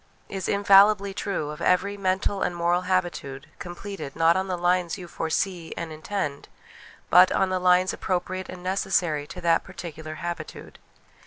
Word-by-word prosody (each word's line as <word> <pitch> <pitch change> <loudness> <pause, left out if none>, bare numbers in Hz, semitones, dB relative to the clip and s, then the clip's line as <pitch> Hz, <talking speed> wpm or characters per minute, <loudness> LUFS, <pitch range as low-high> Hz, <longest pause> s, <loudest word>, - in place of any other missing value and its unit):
' - - -35
is 195 -1 -4
infallibly 200 0 +5
true 190 -7 -3
of 150 - -9
every 195 +3 +2
mental 195 0 -1
and 175 - -1
moral 175 +1 +1
habitude: 175 -7 -1
completed, 175 -4 -7
not 165 +1 +4
on 190 +1 -1
the 185 -1 -2
lines 175 0 +1
you 180 -2 -9
foresee 165 +1 -2
and 170 -1 -5
intend, 155 -2 -4 0.6
but 180 +2 +7
on 190 - +2
the 185 0 0
lines 180 +1 +3
appropriate 185 0 -3
and 180 -1 -9
necessary 180 -5 0
to - - -8
that 170 -1 +2
particular 160 -4 -8
habitude. 170 +2 -7
180 Hz, 160 wpm, -25 LUFS, 170-190 Hz, 0.6 s, but